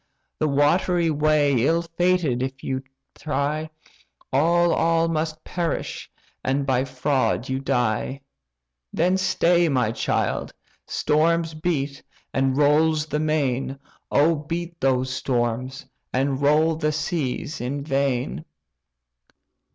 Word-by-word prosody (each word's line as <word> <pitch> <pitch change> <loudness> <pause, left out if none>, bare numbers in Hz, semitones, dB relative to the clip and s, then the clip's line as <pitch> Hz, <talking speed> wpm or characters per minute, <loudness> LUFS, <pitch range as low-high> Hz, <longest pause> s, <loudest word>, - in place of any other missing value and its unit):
The 155 - +2
watery 165 +4 +2
way 145 -4 +2
ill 165 +4 +2
fated 170 -6 +1
if 130 0 -3
thou 130 0 -3 0.3
try, 155 +1 -2 0.6
All, 170 +4 +3
all 165 0 +2
must 155 -1 -2
perish, 175 -2 -3 0.3
and 135 +1 0
by 130 -1 +1
fraud 130 -1 0
you 130 0 -1
die! 125 +1 -1 0.7
Then 180 +3 +2
stay, 175 -2 +2
my, 125 -6 +1
child! - - -1 0.3
storms 165 +2 +1
beat, 150 -4 -2 0.3
and 135 0 +1
rolls 150 +1 +3
the 150 -1 -2
main, 140 -4 0 0.3
Oh, 155 +4 +4
beat 170 +3 -5
those 130 -1 +1
storms, 125 +1 -2 0.3
and 135 +1 0
roll 155 +3 +3
the 155 -1 0
seas 150 -3 -3
in 140 +3 -3
vain!" 135 - -1
150 Hz, 110 wpm, -23 LUFS, 135-165 Hz, 0.7 s, Oh